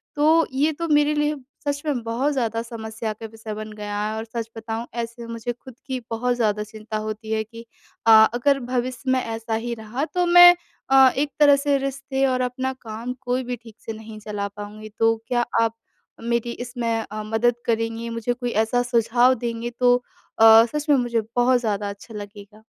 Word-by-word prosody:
तो 315 +2 +4
ये 290 +4 +2
तो 335 +3 -4
मेरे 295 -1 +3
लिए 295 0 +1 0.3
सच 285 0 -1
में 285 -5 -1
बहुत 245 +6 0
ज़्यादा 230 -4 -1
समस्या 225 -1 -5
का 220 +2 -10
विषय 220 -1 -7
बन 215 0 -7
गया 205 0 -4
है। 215 +1 -2
और 220 - -4
सच 230 0 -5
बताऊँ 225 +1 -4 0.2
ऐसे 235 0 -7
मुझे 230 +1 -4
खुद 255 +1 -14
की 260 -2 -2
बहुत 245 +2 0
ज़्यादा 210 -3 0
चिंता 215 0 -7
होती 220 +1 -6
है 220 0 0
कि 230 +1 -12 0.4
अ, - - +8 0.2
अगर 275 +3 +2
भविष्य 255 0 -2
में 260 - +3
ऐसा 225 0 -4
ही 235 +2 -3
रहा 225 +6 -4
तो 360 0 +2
मैं 350 0 +9 0.3
अ, 265 -1 +7
एक 285 0 0
तरह 290 -1 +7
से 280 0 +1
रिश्ते 270 0 -2
और 255 -1 0
अपना 255 +1 -2
काम 230 +2 -5
कोई 255 0 -1
भी 250 0 -3
ठीक 225 -2 -13
से 225 - -4
नहीं 220 0 -10
चला 205 -1 -4
पाऊँगी। 210 +1 -9
तो 225 0 +4
क्या 240 -1 +1 0.2
आप 225 0 +1 0.5
मेरी 235 0 -1
इसमें 240 0 -4 0.2
अ, 215 0 -4
मदद 225 +3 +1
करेंगी? 225 0 -1
मुझे 230 +1 -2
कोई 245 0 -4 0.2
ऐसा 245 +2 +1
सुझाव 245 +1 +3
देंगे 235 0 -3
तो 245 -1 +5 0.4
अ, 225 0 +9
सच 300 0 -3
में 290 - +6
मुझे 240 -2 0
बहुत 245 +1 +4
ज़्यादा 205 -3 -2
अच्छा 200 +3 -10
लगेगा। 205 +1 -10
235 Hz, 195 wpm, -23 LUFS, 220-260 Hz, 0.5 s, मैं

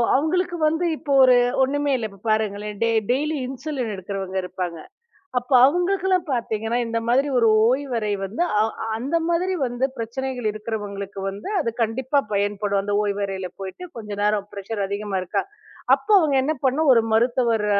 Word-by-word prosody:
அவங்களுக்கு 345 +5 0
வந்து 320 +3 0
இப்போ 290 -3 -6
ஒரு 255 -1 +7 0.3
ஒண்ணுமே 285 +2 0
இல்லை. 235 -4 -2
இப்போ 195 0 -17
பாருங்களேன் 210 -1 -1
டெய் 230 -1 +3
டெய்லி 300 +4 0
இன்சுலின் 265 -3 -4
எடுக்குறவங்க 190 0 -5
இருப்பாங்க. 180 -1 -4 0.6
அப்போ 250 +2 -1
அவங்களுக்கு 355 +6 +1
எல்லாம் 370 -2 +2
பாத்தீங்கன்னா 225 -2 -1
இந்த 230 0 -1
மாதிரி 265 +4 +3
ஒரு 230 - +4 0.2
ஓய்வறை 250 -5 -1
வந்து 205 - -3 0.2
அ - - +4 0.3
அந்த 275 +8 -2
மாதிரி 350 +2 +1
வந்து 245 +1 -1
பிரச்சனைகள் 245 +1 -3
இருக்கிறவங்களுக்கு 205 -2 -5
வந்து 200 - -7
அது 260 - 0
கண்டிப்பா 260 +5 +1
பயன்படும். 200 0 0
அந்த 205 0 -2
ஓய்வறையில 195 -2 -2
போயிட்டு 195 - -7
கொஞ்ச 210 -2 -8
நேரம் 210 -1 +1
ப்ரெஷ்ஷர் 200 +1 -5
அதிகமா 200 0 -3
இருக்கா? - - -1 0.5
அப்போ 430 - -5
அவங்க 300 -5 +2
என்ன 305 +3 +1
பண்ணும்? 280 +4 +2
ஒரு 230 - +5
மருத்துவர் 235 -1 +2
230 Hz, 155 wpm, -23 LUFS, 205-275 Hz, 0.6 s, ஒரு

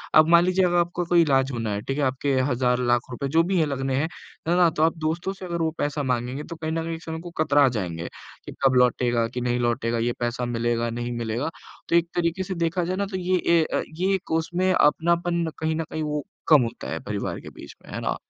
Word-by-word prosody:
अब 155 0 +7
मान 170 0 +7
लीजिए 185 +1 +3
अगर 175 0 +2
आपको 175 0 0
इलाज 140 -5 +4
होना 115 -4 -2
है, 100 - -3
ठीक 135 +5 -3
है? 145 - +1
आपके 135 +2 0 0.2
हज़ार-लाख 125 -1 +2
रुपए 140 +3 -3
जो 165 - +6
भी 185 +1 +1
है 160 - +3
लगने 135 -1 -2
हैं, 145 +4 +1 0.4
है 175 - +3
ना? 175 -2 +6
तो 155 -1 0
आप 165 +1 +2
दोस्तों 160 +4 -2
से 190 -1 -9
अगर 170 -1 -3
वो 160 -1 +1
पैसा 145 0 -1
माँगेंगे 125 +2 -2
तो 170 - -8
कहीं 160 0 -4
न 165 0 -1
कहीं 165 0 -3
एक 160 - -11
समय 160 0 -5
को 175 - -8
कतरा 145 -2 +4
जाएँगे 85 -8 -4 0.4
कि - - -8
कब 135 -1 +4
लौटेगा, 120 -2 +3
कि 125 +2 -5
नहीं 120 0 0
लौटेगा, 120 -1 0
ये 120 +1 0
पैसा 120 +1 -1
मिलेगा, 120 0 0
नहीं 120 +1 -4
मिलेगा। 115 +5 -2 0.4
तो - - +3
एक 170 0 +4
तरीक़े 175 +2 0
से 190 - -4
देखा 170 +1 0
जाए 185 - -1
ना 200 - 0
तो 190 - -2
ये 185 0 +1
ए, 170 -1 +3
अ, - - +2 0.2
ये 190 +2 +1
उसमें 175 +3 +1
अपनापन 170 +2 +2
कहीं 160 0 0
न 165 - -1
कहीं 155 - -2
वो 150 -1 -2 0.3
कम 155 -4 +8
होता 115 - -5
है - - -2
परिवार - - -3
के - - -9
बीच - - -12
में, - - -12
है - - -3
ना? - - -1
155 Hz, 245 wpm, -24 LUFS, 125-170 Hz, 0.4 s, कम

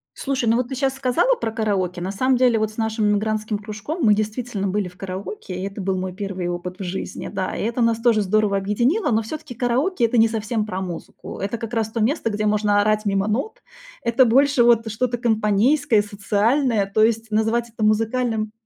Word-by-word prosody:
Слушай, 265 -4 -1
ну 230 - +3
вот 250 -1 -1
ты 265 - -4
щас 270 0 0
сказала 270 - +2
про 225 - -3
караоке. 195 -5 -1
На 185 - -3
самом 255 +6 +1
деле, 245 -3 +3
вот 215 0 -1
с - - -17
нашим 220 -1 0
эмигрантским 215 0 -1
кружком 215 - -6
мы 210 - +6
действительно 215 -1 -2
были 200 0 -1
в 180 - -14
караоке, 190 0 -6
и 185 - -4
это 200 0 -6
был 190 0 -1
мой 185 0 -4
первый 190 -2 -4
опыт 175 +1 -5
в - - -4
жизни. 185 +1 -5
Да, 185 - -3
и - - -3
это 235 +3 -1
нас 230 -1 +2
тоже 230 -3 +3
здорово 205 0 +1
объединило, 240 - +1
но 225 0 +2
всё-таки 295 +3 -7
караоке- 250 - +1
это 230 +1 0
не 225 - +6
совсем 220 0 -2
про 190 -2 -4
музыку. 175 -3 -7
Это 200 +4 -3
как 230 0 -7
раз 225 -2 0
то 230 - -3
место, 235 0 +1
где 210 +1 -2
можно 210 -1 +2
орать 215 +1 +1
мимо 195 0 +1
нот. 275 - -2 0.4
Это 235 +2 +4
больше 270 +2 +4
вот 230 -1 +4
что-то 240 +2 -1
компанейское, 225 +2 +2
социальное. 210 +3 +1
То 215 - +4
есть 225 0 +1
назвать 225 +2 +1
это 225 -1 -5
музыкальным 220 0 +1
220 Hz, 210 wpm, -22 LUFS, 205-240 Hz, 0.4 s, мы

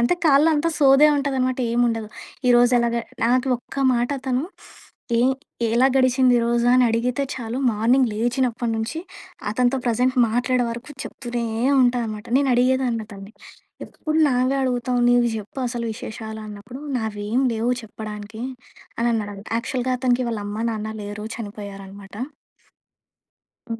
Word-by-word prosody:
అంటే 240 +8 +3
కాల్‌లో 295 0 +5
అంతా 310 +3 +1
సోదే 275 +1 +6
ఉంటాదనమాట. 265 -2 0
ఏం 240 - +2
ఉండదు. 225 -2 -3 0.4
ఈరోజు 245 0 +5
ఎలాగ 235 0 +1 0.3
నాకు 250 +3 +2
ఒక్క 245 - -14 0.2
మాట 240 0 +1
అతను 260 0 -1 0.8
ఏం 245 - +4 0.5
ఎలా 250 +3 +5
గడిచింది 255 -1 +4
ఈరోజు 235 0 +1
అని 255 0 +5
అడిగితే 240 +4 0
చాలు. 240 -1 -4
మార్నింగ్ 240 +4 +3
లేచినప్పటి 240 +1 0
నుంచి 225 +7 -3 0.5
అతనితో 250 +4 +1
ప్రెజెంట్ 250 +3 +1
మాట్లాడే 245 +2 +1
వరకు 240 +5 -7
చెప్తూనే 240 -2 -4 0.4
ఉంటా 245 0 +2
అనమాట. 215 +1 -6
నేను 275 -1 +2
అడిగేదాన్ని 250 -2 +2
అతన్ని 200 0 -11 0.5
ఎప్పుడు 310 +1 -3
నావే 255 +1 +1
అడుగుతావు 250 -1 0
నీవి 245 -1 +4
జెప్పు 215 +5 -8
అసలు 235 -1 -4
విశేషాలు 220 -2 -7
అన్నప్పుడు 210 +6 -9 0.2
నావేమి 220 +3 -1
లేవు 230 +2 0
చెప్పడానికి 215 0 -8 0.6
అని 235 +1 +1
అన్నాడంట. 205 -2 -4
యాక్చువల్‌గా 255 +1 -2
అతనికి 250 0 +1
వాళ్ళ 215 -2 -3
అమ్మ 210 +2 -4
నాన్న 220 -1 -4
లేరు 205 +1 -6
చనిపోయారనమాట. 200 -2 -9 1.6
హ్మ్. 230 0 -4
240 Hz, 135 wpm, -22 LUFS, 220-255 Hz, 1.6 s, సోదే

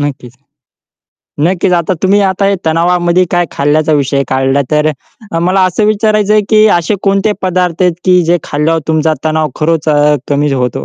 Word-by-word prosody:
नक्कीच. 135 -4 -5 1.1
नक्कीच, 180 +3 0
आता 175 +1 0
तुम्ही, 200 +2 +3
आता 195 0 0
हे 200 - +1
तणावामध्ये 175 +2 +1
काय 175 -1 0
खाल्ल्याचा 155 +2 0
विषय 140 -1 0
काढला, 135 +1 0
तर 150 0 +1 0.4
अ, 165 - -1
मला 185 +3 +1
असं 185 +4 0
विचारायचं 215 -1 +1
आहे, 215 0 +3
की 215 -1 +4
असे 170 +5 -2
कोणते 195 +1 +1
पदार्थ 180 -1 -1
आहेत, 180 -1 +3
की 180 -1 +4
जे 175 +2 +1
खाल्यावर 160 +3 -1
तुमचा 160 0 +1
तणाव 155 0 0
खरंच 160 0 -1
अ, 150 0 +3
कमी 145 0 0
होतो? 125 -3 -2
165 Hz, 170 wpm, -11 LUFS, 150-185 Hz, 1.1 s, की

